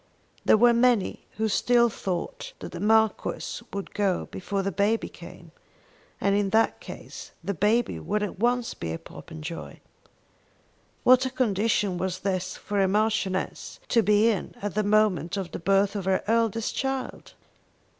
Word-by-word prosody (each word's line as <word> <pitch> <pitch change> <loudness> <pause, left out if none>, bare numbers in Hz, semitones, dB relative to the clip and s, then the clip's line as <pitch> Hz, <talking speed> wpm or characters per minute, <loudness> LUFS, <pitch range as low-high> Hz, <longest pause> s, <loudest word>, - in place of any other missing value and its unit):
There - - +5
were 240 +2 +6
many 235 -4 +2
who 220 0 +1
still 235 +3 +3
thought 235 - -4
that - - -8
the - - -7
Marquis 220 0 +1
would 200 -1 -6
go 200 -3 0
before 195 +1 -3
the 195 - -1
baby 210 +3 +1
came; - - -13 0.7
and, 200 - +2
in 205 -1 +1
that 220 +3 +2
case, - - -10
the 200 +4 -2
baby 210 - +1
would 210 - -1
at 200 -2 -5
once 240 +1 +1
be 80 - -5
a - - -3
Popenjoy. 160 - -9 1.2
What 255 +1 +6
a - - -3
condition 210 -6 0
was 185 +1 -3
this 185 -1 -2
for 205 -1 -1
a 190 - +3
Marchioness 205 -2 -1
to 230 - +4
be 210 +1 +4
in 205 - -4
at 205 -1 -4
the 215 - +1
moment 205 -5 +2
of 190 -3 -4
the - - -5
birth 195 +3 +2
of 200 -3 -3
her 190 0 +1
eldest 225 0 0
child! 270 -1 -4
205 Hz, 160 wpm, -26 LUFS, 190-225 Hz, 1.2 s, were